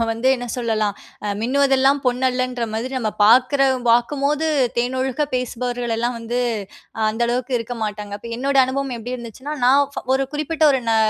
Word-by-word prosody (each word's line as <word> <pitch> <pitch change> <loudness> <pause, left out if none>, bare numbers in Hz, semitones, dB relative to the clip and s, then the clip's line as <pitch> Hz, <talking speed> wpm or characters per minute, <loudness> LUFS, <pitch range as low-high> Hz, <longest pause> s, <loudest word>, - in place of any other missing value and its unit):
நம்ம 230 - +3
வந்து 230 +3 0
என்ன 245 0 -6
சொல்லலாம்? 220 -4 0 0.3
அ - - -2
மின்னுவதெல்லாம் 270 +2 +3
பொன்னல்லன்ற 250 -1 0
மாதிரி, 250 +4 -3
நம்ம 220 -3 -1
பார்க்குற 255 +5 +5 0.3
பார்க்கும்போது 280 +6 +2 0.3
தேனொழுக 260 +3 0
பேசுபவர்கள் 245 -1 -2
எல்லாம் 240 +2 -1
வந்து, 230 +2 -3 0.7
அந்த 225 +2 -2
அளவுக்கு 250 +2 -2
இருக்க 230 +2 -5
மாட்டாங்க. 210 -1 -4
இப்ப 235 - -10
என்னோட 275 +2 -1
அனுபவம் 270 0 -2
எப்படி 245 +2 -5
இருந்துச்சுன்னா, 255 +5 -7
நான் 275 +3 +6 0.3
ஒரு 270 0 0
குறிப்பிட்ட 310 +2 -2
ஒரு 265 - +1
நா 225 - +3
250 Hz, 155 wpm, -21 LUFS, 235-270 Hz, 0.7 s, நான்